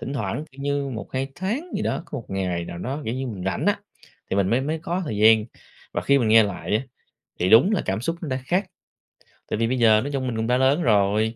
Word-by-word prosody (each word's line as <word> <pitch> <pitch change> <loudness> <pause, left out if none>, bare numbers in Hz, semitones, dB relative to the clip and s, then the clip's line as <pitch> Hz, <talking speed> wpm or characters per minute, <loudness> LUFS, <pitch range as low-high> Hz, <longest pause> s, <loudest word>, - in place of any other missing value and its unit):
Thỉnh 135 - -5
thoảng, 110 +5 -3
kiểu 140 - -13
như, 140 -1 -1
1-2 130 +4 -4
tháng 235 - -3
gì - - -2
đó, - - -1
có 145 - -5
1 115 - -9
ngày 90 -3 -2
nào 85 - -7
đó, 135 +9 -4
kiểu 115 - -2
như, 130 0 -3
mình 95 -6 -6
rảnh 95 -2 -1
á, - - +3 0.5
thì 95 - 0
mình 95 -1 +2
mới 120 +3 +3
mới 155 +4 -2
có 175 +3 -3
thời 110 -8 -4
gian, 110 0 +6 0.5
và - - 0
khi 140 0 +4
mình 115 -4 +1
nghe 110 0 +7
lại 105 +1 -1
á, 115 - -2 0.6
thì 90 - +2
đúng 130 - +7
là 200 - +1
cảm 95 +3 -1
xúc 165 +7 -2
nó 155 - -4
đã 130 0 -1
khác. 180 +5 +1 0.8
Tại - - -2
vì 115 - +2
bây 130 +1 -1
giờ 110 -2 +5
nói 145 - -4
chung 130 -2 -1
mình 120 - -2
cũng 110 +1 -1
đã 125 +1 +3
lớn 135 +5 +3
rồi, 105 -1 +2
120 Hz, 265 wpm, -24 LUFS, 105-140 Hz, 0.8 s, nghe